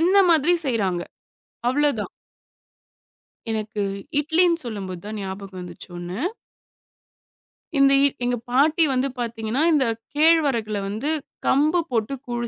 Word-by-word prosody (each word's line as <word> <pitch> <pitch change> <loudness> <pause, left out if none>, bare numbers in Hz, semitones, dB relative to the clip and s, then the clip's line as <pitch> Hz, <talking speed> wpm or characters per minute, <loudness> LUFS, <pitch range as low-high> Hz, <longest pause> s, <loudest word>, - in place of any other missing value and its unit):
இந்த 370 +4 +4
மாரி 330 +1 +4
செய்றாங்க. 195 -8 0 0.7
அவ்ளோதான். 290 +2 +1 1.4
எனக்கு 215 -1 -3 0.4
இட்லின்னு 335 +2 +2
சொல்லும்போது 190 -6 -5
தான் 215 - -5
ஞாபகம் 190 -1 -7
வந்துச்சு 175 0 -10
ஒண்ணு. 175 +4 -5 1.6
இந்த 275 0 +6
இட் 280 - -1
எங்க 245 0 0
பாட்டி 305 +6 +4
வந்து 260 +2 +1
பாத்தீங்கன்னா, 230 +3 -1
இந்தக் 230 -6 +1 0.2
கேழ்வரகுல 275 -10 +3
வந்து 220 +9 -3 0.4
கம்பு 310 +5 +3
போட்டுக் 245 +4 -2
கூழ் 240 -1 -2
245 Hz, 110 wpm, -23 LUFS, 215-295 Hz, 1.6 s, இந்த